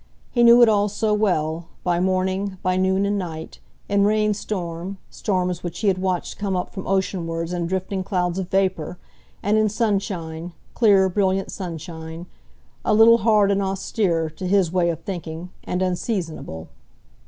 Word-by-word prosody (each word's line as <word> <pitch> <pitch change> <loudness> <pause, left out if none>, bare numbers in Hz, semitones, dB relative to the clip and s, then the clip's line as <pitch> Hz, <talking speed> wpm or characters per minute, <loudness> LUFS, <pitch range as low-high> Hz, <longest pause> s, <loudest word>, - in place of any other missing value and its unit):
He 240 - +1
knew 235 +1 +8
it - - +7
all 210 -1 +3
so 210 +1 0
well, 170 -6 0 0.2
by 175 -1 +1
morning, 190 +1 0
by 185 0 +1
noon 190 +1 +2
and 205 0 0
night; 160 -3 -6 0.3
in 200 0 +2
rainstorm, 200 -4 -1
storms 180 -3 -1
which 175 +2 -6
he 210 - +3
had 185 -1 0
watched 185 -2 -2
come 200 -2 -1
up 180 - -3
from 190 - -6
oceanwards 175 -3 -1
in 175 -1 -1
drifting 190 +1 -2
clouds 180 -1 -1
of 185 -1 -4
vapour; 185 -3 0 0.5
and 210 +2 +3
in 215 -1 +3
sunshine, 190 -6 -2 0.2
clear, 200 -5 +5
brilliant 190 0 0
sunshine, 165 -2 -7 0.6
a - - +2
little 230 +2 +7
hard 210 -2 +4
and 200 0 +1
austere, 190 -3 0
to 185 +4 -6
his 190 -3 +3
way 175 -1 +2
of 165 - -3
thinking, 175 -2 -6
and 180 +1 -1
unseasonable. 175 - -3
190 Hz, 160 wpm, -23 LUFS, 175-200 Hz, 0.6 s, knew